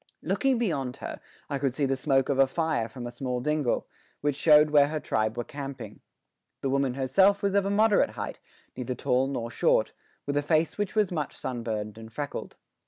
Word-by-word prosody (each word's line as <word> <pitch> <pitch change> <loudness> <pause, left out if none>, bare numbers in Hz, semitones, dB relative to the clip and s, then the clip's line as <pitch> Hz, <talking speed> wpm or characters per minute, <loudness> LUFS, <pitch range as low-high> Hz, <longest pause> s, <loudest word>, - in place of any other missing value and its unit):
Looking 270 -2 +1
beyond 140 - -1
her, - - -7 0.3
I 140 -2 -2
could 135 -2 -1
see 145 - +1
the 135 0 +1
smoke 135 0 +2
of 135 -1 +1
a 135 - +6
fire 155 -5 -1
from 120 +1 -8
a 120 - -5
small 125 0 -3
dingle, 150 -1 0 0.3
which 145 -1 0
showed 150 +1 +6
where 145 -1 +6
her 155 +1 -2
tribe 110 -4 -1
were 120 - -1
camping. 140 +1 -7 0.6
The 135 - -1
woman 135 -2 +1
herself 190 +10 +3
was 200 -1 +1
of 200 -1 +2
a - - 0
moderate 210 +1 +4
height, - - -5 0.4
neither 125 0 -4
tall 125 +2 +1
nor 120 -4 -3
short, - - +2 0.3
with 145 0 -1
a - - +3
face 155 +1 +1
which 205 0 -3
was 210 -4 +2
much 155 -5 -3
sunburned 110 -4 -4
and 110 0 -11
freckled. 145 +4 -5
140 Hz, 200 wpm, -27 LUFS, 125-155 Hz, 0.6 s, a